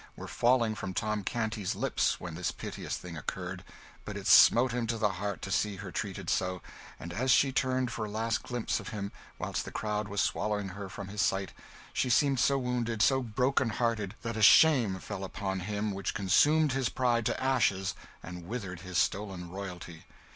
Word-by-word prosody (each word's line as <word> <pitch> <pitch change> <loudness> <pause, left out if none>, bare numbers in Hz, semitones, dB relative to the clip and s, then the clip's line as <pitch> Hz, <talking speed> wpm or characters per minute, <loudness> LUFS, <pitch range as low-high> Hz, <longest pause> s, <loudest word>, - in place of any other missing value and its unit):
were - - -8
falling 120 -2 +2
from 95 -3 -5
Tom 105 -1 -1
Canty's 110 -3 -2
lips - - 0
when 85 -2 -6
this 85 +1 -2
piteous - - -5
thing 90 -2 -8
occurred; 75 - -5 0.4
but - - -6
it - - -7
smote 125 +2 +7
him 120 -1 -2
to 115 0 -1
the 105 -2 +1
heart 100 -1 -3
to 95 - -5
see 105 +1 +1
her - - -8
treated - - -4
so; 90 -1 0 0.4
and 85 +6 -7
as 125 +7 -1
she 135 +1 +5
turned 130 -1 0
for 110 -1 -3
a - - -6
last 110 +2 -1
glimpse 120 -2 -2
of - - -9
him, 100 -3 -4 0.3
whilst - - -3
the - - -8
crowd 105 -1 -2
was 100 0 -3
swallowing 105 -1 0
her 100 +1 -7
from 95 0 -7
his 105 +1 -2
sight, 95 -1 0 0.4
she 130 - 0
seemed 135 +1 +3
so 140 +3 +3
wounded, 120 -3 -2
so 130 +2 +4
broken 125 +2 +1
hearted, 110 -3 -1
that 115 -1 -3
a 110 - -2
shame 120 -5 +6
fell 95 +1 -6
upon 95 0 -3
him 105 +2 -2
which 100 0 -3
consumed 145 - +4
his 130 -2 0
pride 120 -2 +1
to - - -1
ashes, 100 -8 +1 0.3
and 90 0 -8
withered 95 -6 -5
his 90 0 -5
stolen 95 -1 -1
royalty. 90 -4 -8
105 Hz, 195 wpm, -30 LUFS, 95-120 Hz, 0.4 s, smote